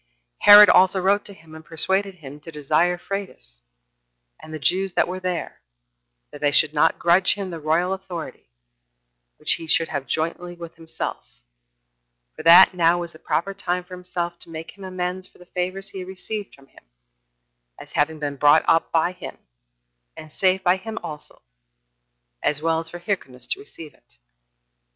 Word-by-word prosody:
Herod 205 0 +10
also 190 +1 +5
wrote 200 +2 +1
to 200 - -9
him, 160 -1 -18
and 160 0 -11
persuaded 190 +5 0
him 145 -4 -11
to 165 +2 -11
desire 155 +4 +1
of 175 - -18
Phraates, 185 - -7 0.8
and 155 - -13
the 155 - -5
Jews 185 +5 0
that - - +2
were 185 +1 -5
there, 180 -3 -4 0.7
that 145 - -11
they 145 - +3
should 155 +1 +3
not 160 +2 +2
grudge 175 +2 +3
him 195 -3 -5
the 165 - -6
royal 165 +5 0
authority, 180 - -8 0.9
which - - +1
he 165 - -8
should 165 +1 +2
have 140 -3 -4
jointly 170 +5 -3
with 170 -1 -10
himself, 165 - -7 1.0
for - - -8
that 170 +4 +8
now 170 -1 +3
was 170 -1 -5
the 155 - -15
proper 195 +4 -2
time 180 -2 -2
for 185 - -14
himself 175 -1 -5
to - - -8
make 160 0 -8
him 200 - -13
amends 185 0 -4
for - - -25
the 180 - -16
favors 185 +2 -3
he 195 - -8
had 185 - -7
received 200 +2 -7
from 140 - -20
him, 100 - -21 0.9
as - - -13
having 155 +2 0
been 145 -2 -4
brought 145 +1 +5
up 165 - +2
by 165 +2 +2
him, 180 0 -10 0.8
and 155 - -11
saved 190 +3 +1
by 180 +1 +3
him 225 +3 -8
also, 155 -3 -10 1.0
as 150 - 0
well 160 +1 0
as 165 0 -8
for 175 - -8
Hyrcanus 175 -9 -4
to 385 - -2
receive 165 - -11
it. - - -30
175 Hz, 180 wpm, -22 LUFS, 155-185 Hz, 1.0 s, Herod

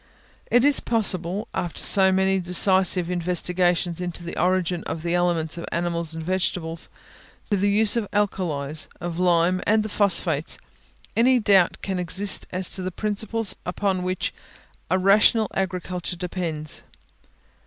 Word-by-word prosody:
Is 270 +4 +5
it - - -13
possible, 195 -4 0
after 175 - -3
so 190 -2 +5
many 190 0 +1
decisive 180 0 +3
investigations 175 0 0
into 175 -1 -4
the 170 - -7
origin 180 -1 0
of 160 0 -5
the 170 0 -2
elements 170 -2 0
of - - -6
animals 170 -1 -2
and 160 -1 -6
vegetables, 175 -2 -2 0.6
the 200 0 +1
use 210 +2 +4
of 230 -3 -1
the - - -3
alkalies, 155 -7 -2
of 175 0 -5
lime 180 0 +2
and 215 +1 +3
the 215 - -5
phosphates, 170 -7 0 0.6
any 250 +2 +3
doubt 195 -5 +2
can 190 -2 -3
exist 190 +3 +2
as 185 0 0
to 190 - +1
the 185 - -3
principles 215 +2 -2
upon 185 +1 -2
which 185 0 -3 0.6
a 185 - +2
rational 210 +3 +4
agriculture 180 -1 -4
depends? 170 -4 -5
180 Hz, 145 wpm, -23 LUFS, 170-195 Hz, 0.6 s, Is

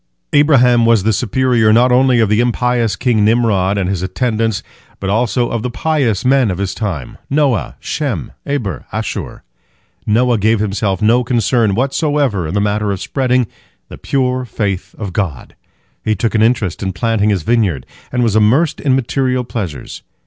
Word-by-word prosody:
" - - -45
Abraham 125 -5 +4
was 115 -4 +3
the 110 +1 +2
superior, 120 0 +2
not 120 +3 +4
only 125 -1 +4
of 110 - +3
the 105 +2 +1
impious 120 -2 +1
king 115 -2 +1
Nimrod 105 -4 +2
and 95 -2 0
his 95 -2 -2
attendants, 110 +2 -1 0.4
but 95 0 -2
also 120 +2 0
of 115 - -2
the 125 - -3
pious 125 -6 -1
men 130 -3 +3
of 90 - -2
his 100 -1 -2
time, 90 - -5
Noah, 140 -6 0
Shem, 120 - -3
Eber, 115 - -2
and - - -2
Asshur. - - -6 0.6
Noah 120 +1 +2
gave 110 +2 +2
himself 105 -1 -1
no 120 +3 +3
concern 115 -3 +1
whatsoever 135 - 0
in 85 - -4
the - - +2
matter 105 0 0
of 95 - -3
spreading 125 +1 0 0.4
the - - -9
pure 130 -1 -1
faith 100 -6 -4
in 105 - -4
God. 90 - -4 0.5
He 110 - 0
took 115 +3 -1
an 110 - +2
interest 110 -5 +1
in 95 -1 -2
planting 105 +3 0
his 95 -6 0
vineyard, 100 - 0 0.3
and 125 -1 0
was 110 -3 +1
immersed 125 +10 +2
in 135 -3 +2
material 130 0 0
pleasures. 95 - -6
115 Hz, 175 wpm, -16 LUFS, 100-125 Hz, 0.6 s, Abraham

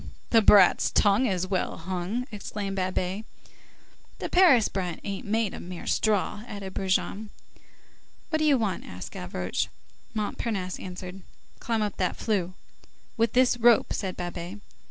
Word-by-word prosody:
"The 225 - +6
brat's 200 -3 +6
tongue's 200 -3 +2
well 185 -1 -1
hung!" 185 +7 -3
exclaimed 205 -1 -5
Babet. 185 +2 -1 0.9
"The - - -4
Paris 330 - +6
brat 180 -4 -3
ain't 200 0 -5
made 220 -1 0
of - - -7 0.3
straw," 210 0 +1
added 195 -3 -7
Brujon. 195 +2 -1 1.0
"What 315 - +1
do 310 - +2
you 290 -3 +5
want?" 215 -5 -1
asked 90 0 -8
Gavroche. 90 0 -3 0.5
Montparnasse 205 -3 -2
answered:— 185 +1 -8 0.4
"Climb 225 -2 0
up 205 -2 -3
that 185 -2 0
flue." 185 -5 -1 0.6
"With 230 -2 +1
this 250 -1 +4
rope," 235 -1 +4
said 190 -3 -3
Babet. 175 +2 -5
200 Hz, 135 wpm, -27 LUFS, 185-220 Hz, 1.0 s, The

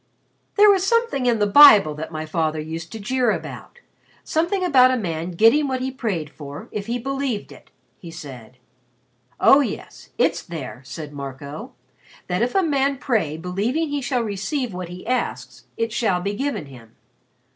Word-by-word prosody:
"There 415 0 +7
was 385 -2 +2
something 460 - +1
in 235 -2 +3
the 205 - +2
Bible 205 - +8
that 150 +2 -7
my 155 -1 -5
father 155 -1 -1
used 160 +2 -6
to 225 - -7
jeer 250 +4 0
about 480 - -5 0.4
something 345 +4 0
about 260 -7 +6
a 255 - +1
man 170 -5 -3
getting 230 - +4
what 260 -1 -2
he 260 +1 -3
prayed 195 - -3
for 145 -1 -9
if 210 -1 -5
he 235 +1 -1
believed 270 -3 -3
it," - - -15 0.3
he 170 - -10
said. 130 -7 -10 0.8
"Oh, 275 - +7
yes, 280 - -5
it's - - +1
there," 155 -7 -8
said 150 +1 -8
Marco. 140 +1 -8 0.5
"That 180 +3 -2
if 245 +1 0
a 385 - +4
man 280 -3 +1
pray 215 - -1
believing 210 - -2
he 290 -1 -2
shall 245 -1 -1
receive 225 +4 -3
what 180 -1 -6
he 180 +1 -9
asks 255 +1 -3
it 230 0 -1
shall 215 -7 +1
be 200 +3 -3
given 275 - -3
him. 120 -4 -15
215 Hz, 175 wpm, -22 LUFS, 160-270 Hz, 0.8 s, Bible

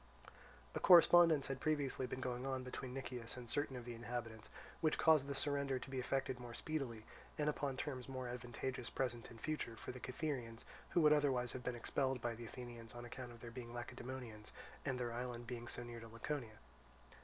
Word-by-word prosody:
A - - -1
correspondence 170 -4 +8
had 135 -1 -2
previously 140 -4 +1
been 130 - -4
going 125 -1 -2
on 130 -1 -1
between 125 0 -5
Nicias 125 -3 -4
and 125 -1 -7
certain 145 +3 0
of 120 -2 -5
the 120 - -4
inhabitants, 115 -1 -4 0.3
which 155 -1 +3
caused 155 -4 +6
the 140 - -2
surrender 140 -1 +1
to 130 - -7
be 130 - -1
effected 130 0 0
more 120 -1 -7
speedily, 130 -8 -2 0.3
and 150 -1 +1
upon 140 -3 0
terms 130 -2 -3
more 130 -1 -3
advantageous, 125 +1 -3
present 120 -3 -1
and 115 - -11
future, 150 -5 -2
for - - -6
the 125 - -8
Cytherians; 125 -4 -3 0.2
who 175 - +4
would 150 -1 +8
otherwise 135 -5 +3
have 130 - -5
been 125 0 -1
expelled 130 +2 +1
by 120 0 -1
the 115 +1 -7
Athenians 120 -1 -8
on 120 0 -6
account 125 0 -6
of 115 -1 -12
their 120 - -7
being 120 -1 -7
Lacedaemonians 120 -3 -5 0.3
and 130 -3 -1
their 120 -1 -1
island 120 0 -3
being 120 0 -5
so 120 - -2
near 120 -1 -6
to 115 - -8
Laconia. 115 0 -4
125 Hz, 200 wpm, -40 LUFS, 120-135 Hz, 0.3 s, correspondence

